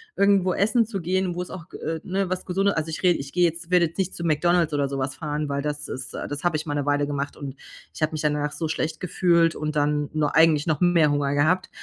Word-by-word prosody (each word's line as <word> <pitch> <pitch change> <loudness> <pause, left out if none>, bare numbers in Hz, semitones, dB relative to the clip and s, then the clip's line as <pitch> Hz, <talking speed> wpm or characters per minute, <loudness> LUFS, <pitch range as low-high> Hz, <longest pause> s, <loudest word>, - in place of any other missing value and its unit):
irgendwo 195 -2 +3
essen 220 +4 +2
zu 200 -4 -5
gehen, 185 +1 0
wo 180 - -2
es 180 - -6
auch, 170 -2 -9
g - - -9
äh, 160 0 -3
ne, 190 0 -1
was 185 - -3
Gesunde 195 +1 +1
also 160 0 -1
ich 160 - -5
rede 175 -2 +4
ich 140 0 -7
gehe 180 0 +2
jetzt 165 +1 -3
werde 180 -2 +4
jetzt 160 - -16
nicht 190 -1 -1
zu 170 - -6
McDonald's 165 0 +2
oder 140 -1 +1
sowas 135 0 -3
fahren, 150 -2 -3
weil 140 0 -1
das 145 0 -4
ist 130 +1 -6
äh, - - -5
das 145 +2 -5
habe 175 -3 +1
ich 155 - -5
mal 145 - -3
'ne 145 -1 -1
Weile 145 0 +1
gemacht 145 0 -3
und 140 -2 -7 0.4
ich - - -11
habe 155 +1 +1
mich 155 - -3
danach 150 -1 0
so 160 - -3
schlecht 160 0 -2
gefühlt 170 -2 +2
und 150 0 -3
dann 150 0 +1
nur 150 -2 0
eigentlich 160 -1 +4
noch 155 -3 +1
mehr 170 -4 +4
Hunger 145 -1 0
gehabt, 175 +6 +2
160 Hz, 270 wpm, -24 LUFS, 145-180 Hz, 0.4 s, rede